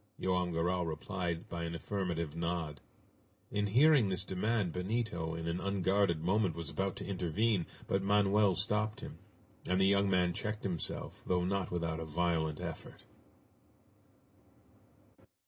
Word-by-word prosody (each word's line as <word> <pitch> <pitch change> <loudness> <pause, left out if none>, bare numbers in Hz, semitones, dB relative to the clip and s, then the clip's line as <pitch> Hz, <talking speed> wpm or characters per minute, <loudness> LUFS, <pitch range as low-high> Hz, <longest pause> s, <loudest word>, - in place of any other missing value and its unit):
Joam 90 -1 +1
Garral 85 +1 0
replied 85 +1 -3
by 85 -1 -4
an 85 0 -3
affirmative 85 -4 -2
nod. 85 -4 -2 0.7
In 105 0 +1
hearing 130 +1 +5
this 95 -2 0
demand 100 -1 0
Benito 90 -4 -2
in 80 0 -4
an 85 +2 -1
unguarded 95 -3 +1
moment 95 -1 +2
was 85 -3 -5
about 95 0 -1
to - - -6
intervene, 95 +1 0 0.2
but 95 - +1
Manoel 100 0 +4
stopped 105 +3 0
him, - - -8 0.5
and 90 +1 +2
the 95 - +5
young 100 0 +4
man 90 -2 +3
checked 105 +4 -3
himself, 90 -5 -3
though 90 -1 +2
not 95 -1 0
without 85 -2 -2
a 80 - -4
violent 80 -1 0
effort. - - -7
90 Hz, 140 wpm, -33 LUFS, 85-100 Hz, 0.7 s, hearing